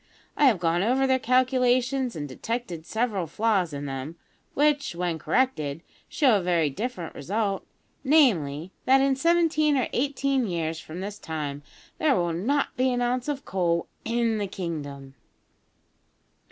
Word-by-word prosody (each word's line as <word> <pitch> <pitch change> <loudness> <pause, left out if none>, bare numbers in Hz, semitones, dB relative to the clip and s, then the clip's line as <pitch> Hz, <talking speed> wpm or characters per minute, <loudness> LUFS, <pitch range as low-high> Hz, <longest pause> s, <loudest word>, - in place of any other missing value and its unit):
I 295 - +4
have 245 -7 +5
gone 170 0 +1
over 255 +6 +2
their 260 0 +2
calculations 255 0 +2
and 145 -2 -4
detected 175 - -5
several 220 -6 -1
flaws 195 -1 +1
in 145 0 -5
them, 135 +3 -5 0.4
which, 290 - +2
when 170 -2 -2
corrected, 165 - 0 0.3
show 260 -8 +4
a - - -4
very 170 -4 +1
different 195 - -5
result 200 +5 -2 0.4
namely, 190 - +3
that 265 +1 +5
in 270 0 +3
seventeen 315 -1 +3
or 255 - +1
eighteen 275 -1 0
years 165 -3 -2
from 160 +3 -8
this 205 +1 -6
time 145 -3 -4 0.4
there 300 -4 +3
will 175 -1 0
not 265 - 0
be 255 +1 +2
an 245 - 0
ounce 245 +2 -1
of 285 -2 -3
coal 170 -3 0 0.2
in 230 -2 0
the 205 - -1
kingdom!" 145 -8 -6
215 Hz, 150 wpm, -26 LUFS, 165-260 Hz, 0.4 s, have